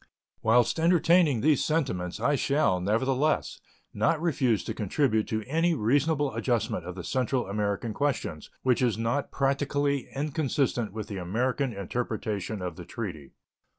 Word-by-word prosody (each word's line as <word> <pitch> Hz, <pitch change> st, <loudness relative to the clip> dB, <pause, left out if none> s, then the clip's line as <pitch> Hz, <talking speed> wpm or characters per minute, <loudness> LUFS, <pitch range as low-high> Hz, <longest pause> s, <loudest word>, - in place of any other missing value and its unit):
Whilst 120 Hz, +5 st, +3 dB
entertaining 165 Hz, -5 st, +4 dB
these 150 Hz, -2 st, +3 dB
sentiments, 115 Hz, -, -1 dB
I 145 Hz, -, +2 dB
shall, 140 Hz, -9 st, +2 dB
nevertheless, 130 Hz, +9 st, 0 dB, 0.3 s
not 160 Hz, -, +1 dB
refuse 130 Hz, -, +1 dB
to -, -, -4 dB
contribute 110 Hz, +1 st, 0 dB
to 110 Hz, -1 st, -2 dB
any 165 Hz, +7 st, +1 dB
reasonable 145 Hz, +4 st, +1 dB
adjustment 115 Hz, -3 st, -1 dB
of 90 Hz, -, -6 dB
the 90 Hz, -, -6 dB
Central 130 Hz, +3 st, 0 dB
American 105 Hz, +2 st, -2 dB
questions 130 Hz, -, -2 dB
which 125 Hz, -2 st, +2 dB
is 120 Hz, -5 st, +2 dB
not 115 Hz, +5 st, -1 dB
practically 140 Hz, 0 st, 0 dB
inconsistent 140 Hz, -, 0 dB
with 110 Hz, 0 st, -6 dB
the 100 Hz, -, -5 dB
American 125 Hz, +9 st, -1 dB
interpretation 105 Hz, -1 st, -3 dB
of 90 Hz, -3 st, -5 dB
the 90 Hz, -, -8 dB
treaty. 90 Hz, -8 st, -6 dB
125 Hz, 140 wpm, -28 LUFS, 105-145 Hz, 0.3 s, entertaining